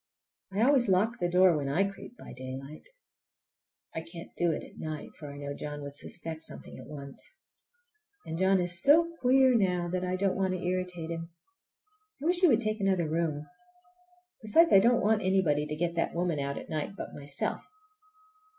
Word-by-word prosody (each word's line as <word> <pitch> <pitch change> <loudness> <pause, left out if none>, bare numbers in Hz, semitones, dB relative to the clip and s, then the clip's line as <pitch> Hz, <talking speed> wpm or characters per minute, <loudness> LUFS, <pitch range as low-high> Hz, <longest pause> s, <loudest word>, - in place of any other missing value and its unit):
I 200 +3 +1
always 255 -4 +4
lock 205 +5 +2
the 175 - 0
door 180 -1 +5
when 140 -2 -2
I 165 +8 +2
creep 200 +5 -7
by - - -11
daylight. 130 +3 -8 1.1
I 160 - -3
can't 165 +1 -10
do 175 - +1
it - - -4
at - - -14
night, 155 -2 -6
for 145 -2 -8
I 140 - -10
know 140 0 -5
John 145 0 -6
would 140 0 -7
suspect 160 +2 -6
something - - -8
at - - -11
once. 140 -2 -10 1.0
And 160 - -5
John 190 +2 +3
is 175 0 +2
so 335 +4 +4
queer 260 +1 +4
now, 180 -6 +1
that 180 +1 -2
I 180 0 -1
don't 195 0 0
want 190 -1 0
to - - -4
irritate 180 -2 -3
him. 165 0 -5 0.9
I 285 - -7
wish 350 +1 +7
he 365 - +7
would 240 -6 +4
take 215 -1 -1
another 190 -4 +1
room! 155 -2 -1 1.0
Besides, 320 +10 +4
I 195 - +9
don't 235 +4 +3
want 215 +1 +3
anybody 170 -6 +1
to 150 - -4
get 170 +2 -1
that 170 0 -1
woman 170 -3 0
out 140 0 -3
at - - -8
night 155 +5 -4
but - - -7
myself. 140 -1 -3
175 Hz, 190 wpm, -29 LUFS, 155-200 Hz, 1.1 s, I